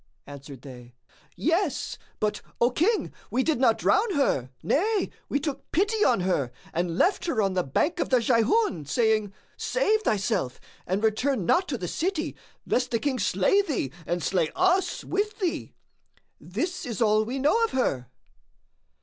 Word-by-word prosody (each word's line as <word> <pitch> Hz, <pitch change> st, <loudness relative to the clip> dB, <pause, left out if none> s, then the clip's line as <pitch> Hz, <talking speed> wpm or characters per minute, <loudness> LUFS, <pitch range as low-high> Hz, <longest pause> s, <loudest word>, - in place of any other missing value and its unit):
Answered 140 Hz, -2 st, -11 dB
they, 125 Hz, -3 st, -12 dB, 0.4 s
"Yes; 330 Hz, 0 st, 0 dB, 0.2 s
but, 210 Hz, -1 st, -1 dB, 0.2 s
O 240 Hz, +2 st, +3 dB
King, 395 Hz, -, +1 dB, 0.2 s
we 260 Hz, -, +1 dB
did 315 Hz, -4 st, +1 dB
not 230 Hz, -4 st, +4 dB
drown 405 Hz, -1 st, +2 dB
her, 140 Hz, -, +1 dB
nay 410 Hz, +6 st, +1 dB, 0.2 s
we 280 Hz, -, +1 dB
took 280 Hz, -2 st, -5 dB
pity 420 Hz, +5 st, +2 dB
on 235 Hz, -7 st, +3 dB
her 165 Hz, -9 st, 0 dB, 0.2 s
and 170 Hz, 0 st, -1 dB
left 375 Hz, -, +2 dB
her 260 Hz, -9 st, 0 dB
on 195 Hz, -3 st, +2 dB
the 185 Hz, -, +2 dB
banks 290 Hz, -, 0 dB
of -, -, -2 dB
the 255 Hz, -, +4 dB
Jayhun, 230 Hz, -, +2 dB
saying,—Save 220 Hz, -, 0 dB
thyself 205 Hz, -, -1 dB, 0.3 s
and 190 Hz, +4 st, -1 dB
return 220 Hz, 0 st, +1 dB
not 370 Hz, -, +3 dB
to 260 Hz, -, -2 dB
the 180 Hz, -, -4 dB
city, 335 Hz, -, -2 dB, 0.3 s
lest 250 Hz, 0 st, 0 dB
the 230 Hz, -, +1 dB
King 260 Hz, +1 st, -1 dB
slay 195 Hz, -, +3 dB
thee 285 Hz, -, -2 dB, 0.2 s
and 175 Hz, -1 st, -1 dB
slay 170 Hz, 0 st, +1 dB
us 370 Hz, +1 st, +2 dB
with 420 Hz, +2 st, -2 dB
thee. 365 Hz, -5 st, -3 dB, 0.6 s
This 360 Hz, +1 st, -3 dB
is 235 Hz, -6 st, -5 dB
all 215 Hz, -1 st, +3 dB
we 245 Hz, +5 st, -4 dB
know 300 Hz, -, +3 dB
of -, -, -4 dB
her." 135 Hz, -, -1 dB
245 Hz, 160 wpm, -26 LUFS, -, 0.6 s, not